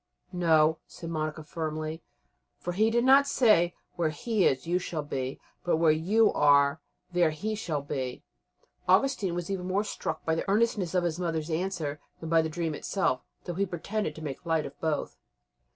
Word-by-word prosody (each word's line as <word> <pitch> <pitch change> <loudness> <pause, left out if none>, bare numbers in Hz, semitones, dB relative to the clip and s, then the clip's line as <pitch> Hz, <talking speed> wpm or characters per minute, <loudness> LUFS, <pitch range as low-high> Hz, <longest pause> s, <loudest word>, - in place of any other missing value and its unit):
"No," 160 -3 +3
said 165 -1 -8
Monica 155 -1 -3
firmly, 155 0 -4 0.6
"for 175 - -4
he 215 +4 +3
did 235 +1 +2
not 275 +2 +7
say, 215 -11 +4 0.2
'Where 170 -2 +2
he 215 - 0
is 130 +2 0
you 175 +2 +1
shall 165 -4 -4
be,' 130 -2 -4 0.2
but, 175 - +2
'Where 160 -1 +5
you 200 +9 +3
are 140 0 +4 0.3
there 175 -2 +3
he 200 +8 -3
shall 160 -9 -3
be.'" 130 -3 -4 0.6
Augustine 190 -2 +3
was 175 +2 -3
even 185 -2 -3
more 195 +3 +1
struck 160 -6 -4
by 160 - +2
the 165 - -2
earnestness 200 -4 +1
of 180 - +3
his 170 -1 -1
mother's 165 -2 -2
answer 160 -4 -2 0.2
than 160 - -6
by 165 0 +5
the 160 - -2
dream 165 0 -2
itself, 140 -6 0 0.2
though 175 - -4
he 195 +4 0
pretended 200 +4 -3
to 160 - -9
make 140 -4 -5
light 165 -2 0
of - - -9
both. 155 -2 -2
165 Hz, 185 wpm, -28 LUFS, 155-190 Hz, 0.6 s, not